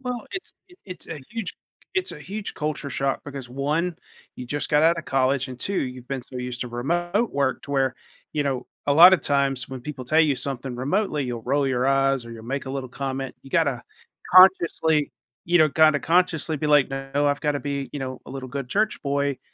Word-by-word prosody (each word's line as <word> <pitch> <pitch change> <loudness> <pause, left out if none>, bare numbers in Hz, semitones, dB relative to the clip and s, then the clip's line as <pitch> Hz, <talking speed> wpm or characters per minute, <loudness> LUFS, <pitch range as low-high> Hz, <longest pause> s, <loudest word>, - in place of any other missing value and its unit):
Well, 250 -3 -4
it's 380 - -6 0.2
i - - -16
it's 185 -2 -9
a 160 - -5
huge 225 -5 -4 0.4
it's 375 -1 0
a - - -9
huge 200 +7 -6
culture 150 -2 -3
shock 135 0 -1
because, 135 -3 -7
1, 150 +6 -1 0.4
you 125 - -7
just 145 +3 -3
got 150 +1 +3
out 165 +1 +4
of - - -6
college 130 0 +1
and, 125 - -8
2, 195 - -3
you've 125 -5 -3
been 135 -2 -4
so 125 - -10
used 125 -1 -5
to 125 - -3
remote 175 - -1
work 140 -2 0
to 140 - -10
where, 135 -2 +1 0.4
you 150 - 0
know, 135 -3 -2 0.2
a 145 - +3
lotta 180 +5 +9
times 140 -6 +1
when 130 -1 -7
people 130 -1 -7
tell 155 +6 +3
you 150 -4 +3
something 130 -1 -3
remotely, 150 +2 0
you'll 120 -2 -4
roll 140 +2 +1
your 130 -1 +1
eyes 135 -2 +2
or 115 - -10
you'll 115 -1 -10
make 135 +3 -4
a 130 - -4
little 135 -2 -4
comment. 135 -1 -4
You 135 - -14
gotta 140 -7 +1 0.5
consciously, 170 -5 +5 0.3
you 175 +1 +3
know, 155 -1 +6
kinda 155 0 +5
consciously 165 -2 +2
be 150 - -2
like, 145 -2 +5
"No, 135 +2 -1
I've 145 0 +1
gotta 145 -2 0
be, 140 -1 -4
you 145 - -4
know, 130 -1 -5
a - - -9
little 130 -1 -6
good 135 -1 -5
church 215 +7 0
boy, 140 -1 0
140 Hz, 220 wpm, -24 LUFS, 130-160 Hz, 0.5 s, lotta